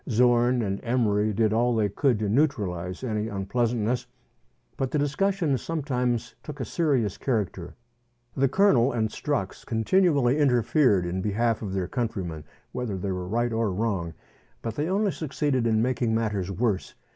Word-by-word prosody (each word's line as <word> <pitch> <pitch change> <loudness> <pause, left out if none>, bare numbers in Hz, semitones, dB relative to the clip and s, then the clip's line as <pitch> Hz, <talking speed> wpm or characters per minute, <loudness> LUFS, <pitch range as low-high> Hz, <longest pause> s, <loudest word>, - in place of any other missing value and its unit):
Zorn 120 +1 +3
and 100 -1 -2
Emery 110 -4 +1
did 110 +1 +1
all 120 +1 +2
they 110 -2 +2
could 120 +4 +1
to 105 0 -1
neutralize 100 - 0
any 110 -3 -1
unpleasantness, 115 +4 -1 0.7
but 135 - -2
the 150 - -1
discussions 150 - 0
sometimes 125 -7 -2
took 150 -1 -9
a 130 - -2
serious 130 - 0
character. 100 -8 -2 0.6
The 135 +1 +3
Colonel 135 -7 +4
and 110 -2 0
Strux 130 -6 -3
continually 140 - +2
interfered 125 - +3
in 90 +2 -2
behalf 110 +3 0
of 100 -4 -4
their 95 -2 -1
countrymen, 95 - -3 0.3
whether 115 -6 -3
they 95 +1 -3
were 90 -1 -4
right 120 +4 0
or 110 -2 0
wrong, 95 -5 -2 0.5
but 115 - -3
they 150 +3 -1
only 200 +1 +1
succeeded 140 -6 -1
in 110 0 +2
making 120 -2 0
matters 105 -5 -1
worse. 100 -1 -1
115 Hz, 155 wpm, -26 LUFS, 105-130 Hz, 0.7 s, Colonel